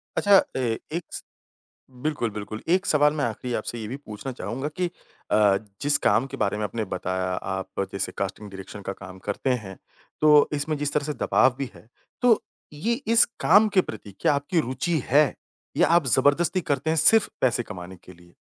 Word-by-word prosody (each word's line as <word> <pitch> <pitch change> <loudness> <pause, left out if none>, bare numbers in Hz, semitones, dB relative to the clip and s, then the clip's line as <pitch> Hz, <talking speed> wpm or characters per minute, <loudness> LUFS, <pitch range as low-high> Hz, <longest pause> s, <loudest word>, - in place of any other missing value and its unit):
अच्छा, 200 -1 +6 0.2
ए 120 -4 -1
एक 170 +2 -2
स - - -6 0.8
बिल्कुल, 150 -7 -1
बिल्कुल। 105 +1 -7
एक 190 +2 0
सवाल 150 0 +4
मैं 145 -2 -1
आख़िरी 120 +2 -4
आपसे 120 - -3
ये 110 - -5
भी 130 - -4
पूछना 130 -1 -7
चाहूँगा 120 +5 -4
कि 180 -1 0 0.4
अ, 105 -2 +4 0.3
जिस 145 0 +3
काम 120 - +2
के 135 0 -8
बारे 105 -3 0
में 105 - -2
आपने 110 +1 -3
बताया, 95 0 -3
आप 95 +1 -3
जैसे 100 -1 -2
कास्टिंग 100 +1 -4
डायरेक्शन 95 +1 -9
का 95 - -4
काम 95 -1 -11
करते 115 +6 -1
हैं, 105 -7 -3 0.4
तो 150 -1 +6
इसमें 150 +1 -1
जिस 145 0 -2
तरह 150 - 0
से 150 - -2
दबाव 130 -1 +4
भी 135 -3 -3
है। 110 - -17 0.3
तो 235 -3 +4 0.3
ये 215 +11 -1 0.2
इस 225 - +8 0.2
काम 215 +1 +6
के 200 -2 +3
प्रति 105 - -8
क्या 145 - +3
आपकी 145 +4 0
रुचि 140 +6 -1
है, 145 0 +4 0.4
या - - +4
आप 170 -3 +4
ज़बरदस्ती 145 +8 +3
करते 145 -1 -1
हैं 160 - +1
सिर्फ़ 220 +7 +5
पैसे 120 -1 +2
कमाने 95 -3 -9
के 90 +1 -15
लिए? 85 0 -20
130 Hz, 195 wpm, -25 LUFS, 105-150 Hz, 0.8 s, इस